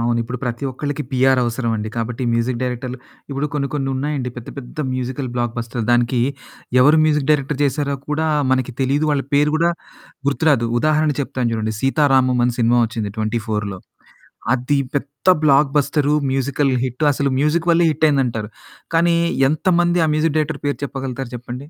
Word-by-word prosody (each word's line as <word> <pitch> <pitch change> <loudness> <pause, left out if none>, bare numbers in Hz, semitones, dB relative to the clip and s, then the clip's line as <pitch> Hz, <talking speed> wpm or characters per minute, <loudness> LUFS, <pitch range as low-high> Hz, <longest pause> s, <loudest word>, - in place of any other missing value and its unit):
అవును. 120 0 +1
ఇప్పుడు 125 +2 -6
ప్రతి 120 +2 -3
ఒక్కలకి 145 +2 -3
పిఆర్ 130 0 +3
అవసరం 120 0 -1
అండి. 105 +1 -4
కాబట్టి 115 +2 -3
మ్యూజిక్ 120 +1 0
డైరెక్టర్లు 125 0 -3 0.3
ఇప్పుడు 140 +2 -1
కొన్ని 140 -1 -1
కొన్ని 135 -2 -1
ఉన్నాయండి 135 -2 -2
పెద్ద 120 - -8
పెద్ద 135 +4 -7
మ్యూజికల్ 130 +1 -3
బ్లాక్బస్టర్ 120 -1 -3
దానికి 120 0 +2 0.6
ఎవరు 150 +3 +5
మ్యూజిక్ 150 -2 +1
డైరెక్టర్ 145 -1 +1
చేశారో 140 +1 -1
కూడా 155 +2 0 0.2
మనకి 130 -2 0
తెలియదు, 140 +4 +1
వాళ్ళ 145 -2 +1
పేరు 150 +1 +3
గూడా 170 +1 +2 0.6
గుర్తురాదు. 145 -5 +2
ఉదాహరణ 155 0 +2
చెప్తాను 130 -3 -2
చూడండి. 110 -1 -2
'సీతారామం' 135 -3 +3
అని 120 - -1
సినిమా 120 +1 +3
వచ్చింది 110 -2 -4
24లో 110 -3 -2 0.8
అది 130 +3 0 0.2
పెద్ద 145 +5 0
బ్లాక్ 140 -1 +4
బస్టర్ 145 0 +1 0.2
మ్యూజికల్ 135 +1 0 0.2
హిట్ 125 +3 -5
అసలు 140 0 0
మ్యూజిక్ 155 +4 +1
వల్లే 170 0 +4
హిట్ 155 - 0
అయింది 140 -2 +2
అంటారు. 115 -3 -4 0.5
కానీ 170 +1 +4 0.3
ఎంతమంది 175 +3 +2
ఆ - - +2
మ్యూజిక్ 155 0 +1
డైరెక్టర్ 150 -1 -2
పేరు 145 - -1
చెప్పగలుగుతారు 135 -2 -5
చెప్పండి? 120 +1 -7
135 Hz, 160 wpm, -20 LUFS, 120-150 Hz, 0.8 s, ఎవరు